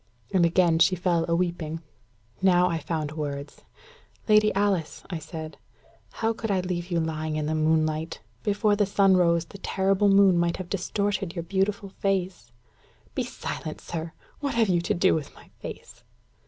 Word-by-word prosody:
And 175 -3 +5
again 170 -1 +3
she 185 +2 +5
fell 175 -2 +1
a 170 - +3
weeping. 170 -2 -2 0.6
Now 180 -1 +5
I 165 - -1
found 155 -1 -3
words. 145 -2 -5 0.7
"Lady 215 -1 +5
Alice," 195 -5 0
I 170 - -3
said, 155 0 -8 0.5
"how 225 0 0
could 225 0 -5
I 190 -2 +2
leave 180 -1 -3
you 170 -2 +1
lying 155 -1 -2
in 155 -1 -1
the 155 - -1
moonlight? 155 0 +1 0.2
Before 205 0 +2
the 205 -1 +2
sun 195 -1 +4
rose, 170 -2 +3
the 200 - -12
terrible 195 +1 +2
moon 195 -3 +5
might 170 0 +1
have 185 -2 -7
distorted 195 -1 -1
your 170 - -3
beautiful 195 +3 -1
face." 190 - -2 0.6
"Be - - -1
silent, 155 - -6
sir. 165 0 -5 0.3
What 285 -4 -2
have 225 -3 +3
you 175 -2 +3
to 205 +4 0
do 185 +2 +4
with 150 -3 -3
my - - -17
face?" - - -9
175 Hz, 170 wpm, -26 LUFS, 160-195 Hz, 0.7 s, And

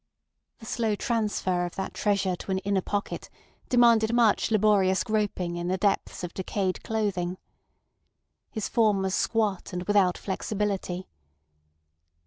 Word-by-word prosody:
The 225 - -13
slow 220 -1 0
transfer 210 -6 0
of 175 0 -5
that 195 - -4
treasure 200 -3 +1
to - - -10
an 190 - +1
inner 195 0 0
pocket 205 +2 -3 0.4
demanded 235 -2 +4
much 230 -3 +3
laborious 205 -3 +3
groping 205 -6 -1
in 175 0 -3
the 185 +1 0
depths 195 -1 0
of 175 - -5
decayed 190 0 -2
clothing. 190 -5 -1 1.1
His 220 -4 -3
form 210 -5 +2
was 190 -1 -1
squat 210 -5 0
and 180 0 -3
without 195 -2 +3
flexibility. 195 -2 -3
200 Hz, 130 wpm, -27 LUFS, 185-215 Hz, 1.1 s, demanded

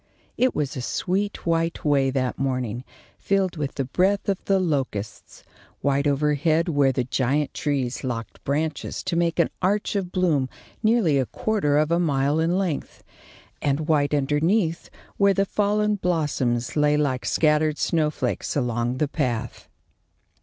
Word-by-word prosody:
It 255 0 +1
was 145 -1 -2
a 130 - -4
sweet, 195 +10 -2
white 165 -1 0
way 140 -2 +3
that 130 -2 -1
morning, 125 -3 -2 0.4
filled 195 -2 0
with 145 -3 -4
the 135 - -1
breath 190 +9 +1
of 195 -1 -1
the 195 - +3
locusts; 135 - -3 0.4
white 140 +1 +1
overhead 150 +3 +2
where 145 -4 +3
the 130 -1 -1
giant 135 +4 0
trees 135 -4 -2
locked 120 -3 -5
branches 150 +1 -2
to 185 -2 -2
make 170 0 +1
an 170 - +2
arch 205 +3 0
of 185 -3 -2
bloom 155 -9 +1 0.3
nearly 215 -10 +3
a 130 - 0
quarter 195 -10 0
of 155 +1 +2
a 170 - +3
mile 145 -2 +1
in 170 +3 +1
length, 180 -7 -3 0.6
and 140 +1 0
white 150 -2 +2
underneath 160 +6 +1 0.3
where 200 -1 +4
the 195 - +2
fallen 210 +1 +1
blossoms 145 -9 -1
lay 150 0 +3
like 135 -4 0
scattered 150 -1 +2
snowflakes 155 -2 -1
along 120 -2 -1
the 150 - +1
path. 125 -6 -3
150 Hz, 150 wpm, -24 LUFS, 135-175 Hz, 0.6 s, where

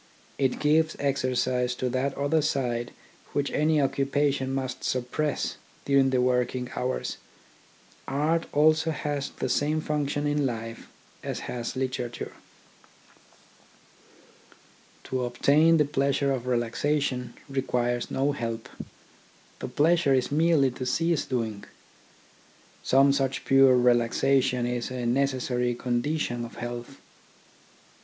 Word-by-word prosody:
It 135 -2 +1
gives 155 +1 +2
exercise 130 -2 0
to 130 - -2
that 130 +2 -1
other 145 +3 +2
side 120 -5 -1 0.4
which 145 0 0
any 155 +1 +2
occupation 135 0 0
must 130 -1 -3
suppress 130 +4 -1 0.3
during 140 -1 +4
the 130 -1 +1
working 125 0 0
hours. 130 +1 -2 0.9
Art 155 +5 0
also 155 +2 +3
has 145 -2 -2
the - - -4
same 150 +5 +1
function 145 -1 -1
in 145 0 +1
life 115 -3 -4 0.4
as - - -4
has 120 -1 -5
literature. 125 -2 -3 2.7
To 130 -1 -2
obtain 145 +7 +4
the 150 - +3
pleasure 140 -1 +1
of 125 -2 -3
relaxation 125 +2 -1
requires 125 -3 -1
no 140 +2 +1
help. 115 -4 -4 0.9
The - - -4
pleasure 150 +1 +3
is 130 +1 0
merely 155 -3 +3
to 125 +1 -6
cease 165 +3 +1
doing. 110 -5 -3 1.2
Some 135 +1 +4
such 135 -1 -1
pure 135 -1 +6
relaxation 125 +1 +2
is 120 -1 -2
a 125 -1 -4
necessary 125 -1 0
condi 125 +6 -1
tion 120 -5 -2
of 120 - -8
health. 120 +2 -6
135 Hz, 115 wpm, -27 LUFS, 125-145 Hz, 2.7 s, pure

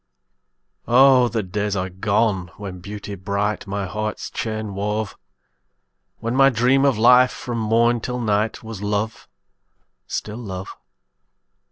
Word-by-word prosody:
Oh! 130 0 +6
the 115 -2 -2
days 105 +2 -2
are 95 -1 -2
gone, 100 -1 0
when 95 -3 -7
Beauty 100 +2 -7
bright 100 +2 -2
My 100 0 -2
heart's 105 +3 -4
chain 110 -2 -4
wove; 105 +1 -2 1.0
When 115 +2 -3
my 135 0 +6
dream 130 +3 +3
of 135 -5 +3
life, 125 +3 +6
from 120 -2 -5
morn 115 +2 +2
till 125 +2 -3
night, 105 -1 0
Was 110 -3 -7
love, 105 +2 -2 0.8
still 105 +2 -4
love. 95 -5 -7
105 Hz, 130 wpm, -22 LUFS, 100-120 Hz, 1.0 s, Oh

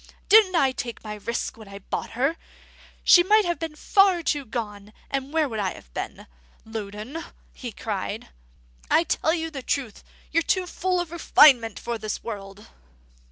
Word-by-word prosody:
Didn't 415 -3 +7
I 275 -5 +4
take 240 -3 -6
my 215 -1 -5
risk 220 +3 -4
when 220 -2 -12
I 200 0 -9
bought 200 - -5
her? 275 +6 +2 0.7
She 350 - +8
might 420 +3 +4
have 345 -1 -1
been 325 -2 -4
too - - -18
far 380 +1 +3
gone; 215 -8 -3 0.2
and 275 0 -2
where 320 -1 +2
would 225 -4 -4
I 190 -3 -1
have - - -16
been? - - -6 0.4
Loudon," 220 +7 -6 0.3
he 245 -3 -7
cried, 210 0 -4 0.6
"I 330 - +5
tell 320 -1 +1
you 325 -1 -3
the 275 -3 -6
truth: 250 -4 -3 0.3
you're 330 - +3
too 370 +3 +1
full 365 +1 -1
of 350 -2 -3
refinement 275 -9 +5
for 235 -1 -4
this 215 0 -4
world!" 200 -1 -7
265 Hz, 170 wpm, -25 LUFS, 215-330 Hz, 0.7 s, She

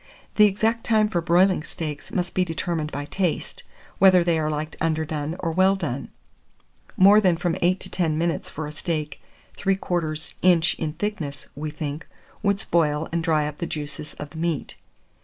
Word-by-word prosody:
The 210 -1 +8
exact 225 +3 0
time 215 -2 +3
for 175 -5 0
broiling 180 +1 +3
steaks 155 -2 -6
must 180 -1 -2
be 185 - +2
determined 165 -2 -2
by 145 +1 -4
taste, 180 +1 -2 0.4
whether 185 -2 +7
they 170 -2 +2
are 155 -1 0
liked 155 +1 -3
underdone 160 -1 -1
or 170 -3 -2
well 190 +3 +4
done; 140 -8 -4 0.9
more 200 +3 +7
than 180 -4 +3
from 175 -1 0
8 180 +2 +2
to - - -1
10 160 -4 0
minutes 170 +1 -1
for 155 - -5
a 150 - -6
steak 155 -1 -3 0.4
3/4 175 -5 -1
inch 175 -2 +4
in 155 -2 -2
thickness, 160 -6 -4
we 155 +2 -4
think, 150 0 -5 0.3
would 200 -1 +1
spoil 155 -3 +1
and 170 0 -1
dry 155 -3 +2
up 150 -1 -7
the 170 - -2
juices 150 0 -5
of 145 0 -8
the 160 - -10
meat. 165 -3 -2
165 Hz, 175 wpm, -24 LUFS, 155-185 Hz, 0.9 s, The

